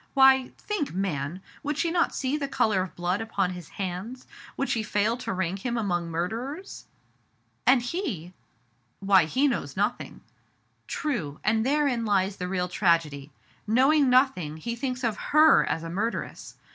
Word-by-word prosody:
Why, 265 -1 +6
think, 335 - -3
man, 180 -2 -3 0.2
would 295 -1 -3
she 335 +1 0
not 340 0 +1
see 265 +1 -1
the 290 -2 -2
color 215 -7 +1
of 185 - -6
blood 180 +4 -1
upon 200 -5 -1
his 175 -3 -9
hands, 195 +7 -5 0.3
would 275 - 0
she 225 - 0
fail 210 +1 0
to 245 -2 -4
rank 190 +1 -2
him 240 -1 -1
among 175 -6 -1
murderers? 230 - -4 0.8
And 250 -1 +5
he 240 - -4 0.2
" 120 0 -41
" 120 -1 -44
Why, 195 -3 +5
he 260 - +2
knows 165 - -3
nothing." 205 +5 -2 0.4
" - - -43
True; 195 - -3
and 220 +1 +2
therein 275 -3 +1
lies 200 -2 +1
the 180 - -4
real 180 -1 -1
tragedy. 165 -6 0 0.4
Knowing 270 +5 +4
nothing, 250 - +2
he 235 +9 -4
thinks 255 0 -4
of 225 -3 0 0.2
her 310 +1 +7
as 165 - -2
a 165 - -5
murderess. 220 +6 -4
210 Hz, 170 wpm, -26 LUFS, 180-260 Hz, 0.8 s, her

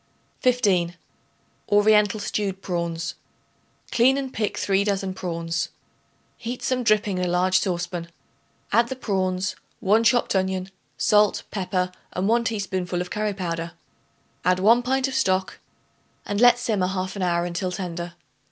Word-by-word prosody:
15. 195 -9 +2 0.7
Oriental 210 0 +4
Stewed 200 -1 -2
Prawns. 170 -2 -2 0.8
Clean 260 +3 +4
and 270 -2 -4
pick 210 -2 -2
3 195 0 +2
dozen 195 -2 -1
prawns. 165 -2 -3 0.7
Heat 245 +1 -5
some 255 +1 0
dripping 210 -4 +2
in 180 - 0
a - - -1
large 185 +1 +3
saucepan; 175 -2 -3 0.6
add 235 0 +4
the 265 - -3
prawns, 190 -5 -1 0.2
1 215 +4 +3
chopped 240 -2 +3
onion, 190 0 -1 0.3
salt, 210 0 +3
pepper 185 -2 -1 0.2
and 185 +2 -1
1 235 +2 +3
teaspoonful 190 -5 -2
of 180 0 -4
curry 210 -1 -1
powder. 170 -3 -3 0.7
Add 180 +1 +3
1 225 +6 +5
pint 265 +2 +1
of 270 - -5
stock 190 -8 0 0.7
and 205 +1 -1
let 245 0 +7
simmer 215 -6 0
half 185 0 -3
an 200 - -4
hour 175 -1 +1
until 175 +1 -2
tender. 175 -2 -5
190 Hz, 145 wpm, -24 LUFS, 180-215 Hz, 0.8 s, let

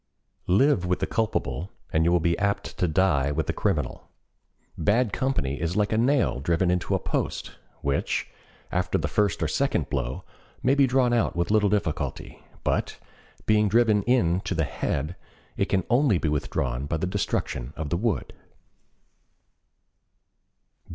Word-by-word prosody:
Live 100 +2 +4
with 90 0 0
the - - -1
culpable 95 - -2 0.2
and 80 +1 +3
you 85 - +3
will 90 - +4
be 85 +1 +1
apt 100 -1 -1
to 90 - +1
die 80 -5 +2
with 75 - -1
the - - -1
criminal. - - -2 0.7
Bad 105 +6 +1
company 75 - -1
is 85 +2 -1
like 105 0 +1
a - - +2
nail 130 - +2
driven 85 +5 +1
into 90 -1 0
a - - +1
post, - - -2 0.3
which, 70 0 0 0.4
after - - 0
the - - -1
first 105 -4 +1
or - - +1
second - - 0
blow, - - -2 0.4
may 130 +2 +4
be 140 -1 +4
drawn 125 -1 +2
out 120 -2 +1
with 85 +3 0
little 105 -1 +4
difficulty, 95 -6 -2 0.2
but, - - -1 0.5
being 105 -1 +3
driven 110 -1 +4
in 95 -9 +3
to 95 - -3
the 80 - +1
head, 75 +3 -2 0.4
it - - +1
can 95 -2 0
only 120 -4 +3
be 80 - -1
withdrawn 70 -3 -2
by 80 - -1
the 80 - -1
destruction 80 -9 -2
of 75 -2 -5
the 85 - +1
wood. 105 - -1
90 Hz, 160 wpm, -26 LUFS, 80-110 Hz, 0.7 s, Live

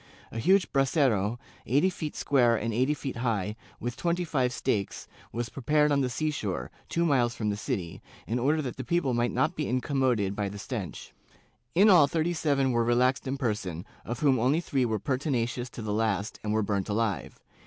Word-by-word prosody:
A 115 - -4
huge 190 - +3
brasero, 130 - +2 0.3
eighty 145 - +3
feet 155 -4 -5
square 120 -4 +3
and 115 +1 -2
eight 130 +6 +2
feet 135 -4 -5
high, 105 -4 -1 0.2
with 120 +1 -3
twenty 175 +1 -1
five 130 -6 +1
stakes, 100 -4 -2 0.2
was 120 0 -3
prepared 150 +4 +2
on 140 -1 +3
the 130 - 0
sea 155 +5 -1
shore, 95 - -3 0.2
two 170 0 +1
miles 125 -6 +2
from 105 -2 -1
the - - -1
city, 90 -4 -4 0.2
in 115 +3 -1
order 150 +5 +2
that 125 - -5
the 130 - -4
people 140 0 0
might 120 0 +1
not 160 +3 +1
be 150 - -2
incommoded 125 -6 +1
by 100 -1 -1
the 100 - -8
stench. 100 - -6 0.6
In 200 +5 +6
all 175 -8 +7
thirty 165 +3 0
seven 140 -5 +1
were 120 -1 +2
relaxed 125 +3 +2
in 135 +1 -2
person, 105 - -2 0.2
of 120 0 -5
whom 135 -4 +4
only 130 +7 +3
three 135 -6 0
were 110 -2 0
pertinacious 125 -2 -1
to 120 - -8
the 105 -1 -2
last 105 -1 -1
and 105 - -1
were 110 0 +2
burnt 100 -1 -1
alive. 105 -2 -1
125 Hz, 195 wpm, -28 LUFS, 110-145 Hz, 0.6 s, all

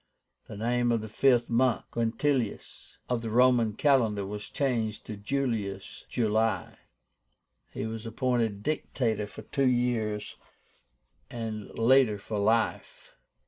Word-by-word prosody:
The 105 - -8
name 120 +2 +1
of 115 -2 +1
the 110 - -6
fifth 120 +2 +3
month 120 0 +2
(Quintilis) 115 0 -2
of 125 -2 -1
the 115 - -4
Roman 120 -1 +4
calendar 110 -6 +2
was 105 +1 -6
changed 115 -6 -1
to 110 - -6
JULIUS 105 -4 -3
(July). 110 -4 0 0.9
He - - -5
was 110 0 -5
appointed 115 -3 -1
Dictator 115 -7 -1
for 100 - -11
two 140 -2 0
years, 120 -4 0 0.9
and 110 -3 -5
later 120 -2 +4
for 105 +1 -4
life. 110 +3 0
115 Hz, 120 wpm, -28 LUFS, 105-125 Hz, 0.9 s, Roman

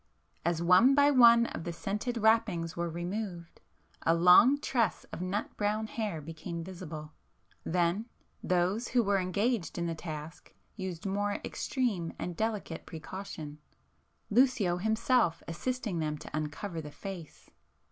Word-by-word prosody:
As 170 0 0
one 185 +10 +6
by 285 0 +5
one 235 -3 +7
of 165 - -5
the 175 - -3
scented 210 +7 -3
wrappings 215 -7 +2
were 170 0 -2
removed, 175 0 -5 0.4
a 165 - +3
long 180 +11 +7
tress 235 -8 0
of - - -5
nut 185 +3 -3
brown 210 +1 0
hair 215 -6 -3
became 165 +2 -6
visible,—then, 170 +2 -4 0.4
those 185 +6 +1
who 245 -1 +2
were 200 -1 +2
engaged 200 +2 -1
in 170 - -1
the 165 - -1
task, 155 -1 -8 0.2
used 185 -4 -6
more 205 +1 0
extreme 210 - -2
and 175 - -4
delicate 210 -5 -3
precaution, 160 -3 -7 0.7
Lucio 215 -7 +3
himself 220 -2 +1
assisting 210 +2 -3
them 150 -1 -2
to - - -8
uncover 155 +3 -4
the 150 - -8
face. 175 0 -9
185 Hz, 135 wpm, -30 LUFS, 165-220 Hz, 0.7 s, one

